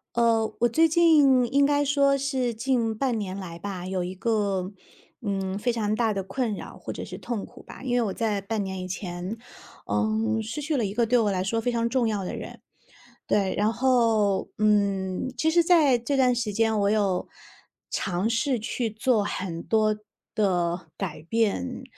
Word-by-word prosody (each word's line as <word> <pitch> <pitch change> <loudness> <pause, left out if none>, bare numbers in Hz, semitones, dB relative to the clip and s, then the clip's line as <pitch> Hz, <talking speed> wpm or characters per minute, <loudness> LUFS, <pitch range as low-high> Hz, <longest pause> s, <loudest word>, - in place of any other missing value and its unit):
呃， 230 -2 +2
我 240 - +4
最 320 +8 +4
近 295 -6 +5
应 280 0 +5
该 290 0 +2
说 280 -1 +3
是 265 -3 -1
近 230 -2 0
半 245 -2 0
年 195 -2 -4
来 170 -3 -7
吧， 185 -2 -5
有 185 -1 -2
一 180 +1 -5
个， 200 -3 -1 0.5
嗯， 195 -3 -2
非 245 +3 +1
常 215 -3 -1
大 225 0 +1
的 195 -1 -2
困 220 +3 -2
扰 - - -9
或 - - -6
者 - - -6
是 - - -8
痛 235 -5 -4
苦 - - -15
吧， - - -12
因 255 -2 -2
为 245 - +3
我 215 -4 -1
在 210 -1 -1
半 210 +1 -2
年 190 -1 -5
以 185 - -5
前， 180 +2 -5 0.5
嗯， 220 +1 0
失 225 +7 -5
去 305 +1 -1
了 250 - +1
一 195 - -3
个 235 0 +3
对 245 +2 +3
我 210 -3 +2
来 185 -1 -1
说 225 +4 -1
非 245 - 0
常 230 -1 0
重 240 -1 +1
要 210 -3 -1
的 180 - -4
人。 - - -8 0.7
对， 195 -2 +1
然 210 +2 +2
后， 230 -6 +2
嗯， 200 +1 +1
其 315 +6 +2
实 340 +1 +4
在 310 -8 +5
这 260 +4 -1
段 255 -2 +4
时 235 -3 -2
间 220 +1 +1
我 200 0 +2
有 200 -4 +1 0.6
尝 190 +3 -1
试 245 +2 +1
去 235 +1 -2
做 220 0 +1
很 180 -4 -4
多 215 -1 +2 0.4
的 175 -4 0
改 170 -6 -5
变， 200 - -1
220 Hz, 205 characters per minute, -26 LUFS, 195-245 Hz, 0.7 s, 近